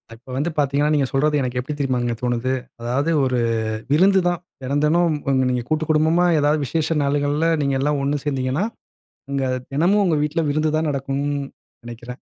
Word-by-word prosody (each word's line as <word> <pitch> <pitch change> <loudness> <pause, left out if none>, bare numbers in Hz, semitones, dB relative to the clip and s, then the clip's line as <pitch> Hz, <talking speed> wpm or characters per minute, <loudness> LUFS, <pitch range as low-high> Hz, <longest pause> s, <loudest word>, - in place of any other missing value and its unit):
இப்போ 120 +3 -20
வந்து 155 +5 0
பாத்தீங்கன்னா 145 +1 +2
நீங்க 140 -2 +2
சொல்றது 150 +2 +2
எனக்கு 125 0 -2
எப்படி 140 +4 -4
தெரியுமாங்க 125 -3 0
தோணுது, 125 +1 0 0.3
அதாவது 135 +7 0
ஒரு 130 -1 0 0.5
விருந்து 190 +5 +5
தான். 175 -1 -1 0.2
தெனந் 140 +3 -1
தெனம் 170 +1 +3 0.2
வந்து 130 -1 +2
நீங்க 125 -1 -1
கூட்டு 155 0 0
குடும்பமா, 160 +3 +3
ஏதாவது 150 0 +2
விசேஷ 160 +3 -1
நாள்கள்ல, 145 +3 +1
நீங்க 140 -1 0
எல்லாம் 145 0 +1
ஒண்ணு 140 0 -1
சேந்தீங்கனா, 135 +4 -1 0.7
உங்க 135 -1 -1 0.3
தினமும் 180 +8 +3
உங்க 165 - +2
வீட்ல 150 +3 0
விருந்து 155 +1 0
தான் 160 0 0
நடக்கும் 140 0 -2 0.6
நெனைக்கிறேன். 120 +2 -9
145 Hz, 165 wpm, -21 LUFS, 130-155 Hz, 0.7 s, விருந்து